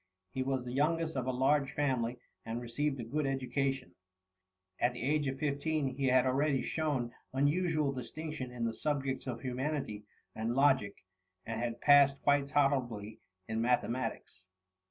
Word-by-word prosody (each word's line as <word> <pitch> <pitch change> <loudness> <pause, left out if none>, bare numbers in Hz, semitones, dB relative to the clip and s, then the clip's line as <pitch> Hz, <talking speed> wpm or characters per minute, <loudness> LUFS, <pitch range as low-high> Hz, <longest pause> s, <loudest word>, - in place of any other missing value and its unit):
He 130 - -2
was 130 -1 -1
the 125 - -5
youngest 160 +3 +1
of 130 -1 -2
a - - +2
large 135 +2 +2
family, 125 -4 0 0.3
and 115 +1 -3
received 135 +4 -2
a - - -3
good 145 +5 -1
education. 135 -5 -1 0.9
At 120 +1 +2
the 120 - -6
age 145 +2 +1
of 135 0 -2
15 145 0 -1
he 135 -1 0
had 130 0 +5
already 135 0 +2
shown 140 -7 -1 0.2
unusual 150 +1 +2
distinction 140 +1 -5
in 120 -1 -3
the 115 - -1
subjects 135 -1 -2
of 120 -2 -4
humanity 130 -4 -2 0.3
and 115 +2 -2
logic, 130 -9 +2 0.4
and 115 0 -3
had 120 -1 -3
passed 140 -1 +6
quite 145 -1 +3
tolerably 125 -7 0 0.3
in 110 +1 -1
mathematics. 120 -5 -1
135 Hz, 155 wpm, -33 LUFS, 120-145 Hz, 0.9 s, passed